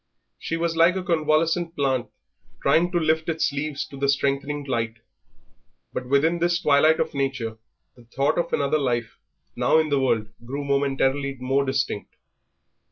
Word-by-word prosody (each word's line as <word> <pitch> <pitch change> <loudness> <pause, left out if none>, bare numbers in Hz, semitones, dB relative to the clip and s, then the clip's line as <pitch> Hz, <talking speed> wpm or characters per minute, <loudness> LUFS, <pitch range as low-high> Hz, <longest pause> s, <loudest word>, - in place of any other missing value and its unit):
She 165 - -3
was 165 0 -1
like 170 +3 +4
a 190 - -2
convalescent 165 0 +1
plant 130 -4 0 0.6
trying 175 +2 +3
to 175 - +1
lift 160 0 +1
its 160 -1 0
leaves 145 0 -3
to 140 - -10
the 140 0 0
strengthening 140 +1 0
light, 115 -4 -2 1.0
but 125 - -4
within 155 +6 +2
this 175 0 +1
twilight 155 -1 +4
of - - -1
nature 130 -5 -2 0.4
the 120 - -18
thought 135 +7 0
of 170 0 -2
another 140 +2 +1
life, 120 -5 -2 0.4
now - - +3
in 160 -1 +2
the 140 -1 +2
world, 115 -5 0
grew 140 +4 -5
momentarily 140 0 0
more 135 +2 +1
distinct. 130 -6 -2
140 Hz, 160 wpm, -24 LUFS, 135-160 Hz, 1.0 s, like